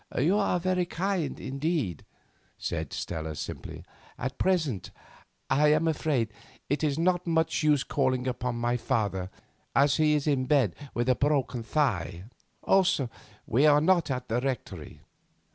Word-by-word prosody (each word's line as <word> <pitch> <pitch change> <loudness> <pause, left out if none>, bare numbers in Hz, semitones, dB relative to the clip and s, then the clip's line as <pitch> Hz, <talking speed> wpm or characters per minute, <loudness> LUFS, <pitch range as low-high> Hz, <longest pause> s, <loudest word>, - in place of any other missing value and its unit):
"You 160 +10 +3
are 190 -3 +1
very 180 0 0
kind 180 -4 -2
indeed," 135 - -2 0.5
said - - -3
Stella 80 -2 -4
simply. - - -7 0.3
"At 130 +2 -4
present, 160 - 0 0.6
I 150 +2 +3
am 155 +2 +2
afraid, 145 -7 0 0.4
it 145 +2 0
is 145 -2 +1
not 175 +1 +1
much 160 -1 +1
use 150 -3 +3
calling 130 -3 0
upon 125 -1 -2
my 120 +1 0
father, 105 -7 -1 0.5
as 140 +1 +4
he 155 -1 +4
is 145 - -1
in 135 -4 +1
bed 130 - +3 0.2
with 120 +1 0
a 130 - +5
broken 135 -3 0
thigh; 100 - -1 0.4
also, 190 -10 +3 0.3
we 135 +7 +3
are 145 0 +6
not 170 0 +3
at 125 -1 -3
the 115 +2 0
Rectory. 115 - -5
140 Hz, 145 wpm, -28 LUFS, 120-160 Hz, 0.6 s, are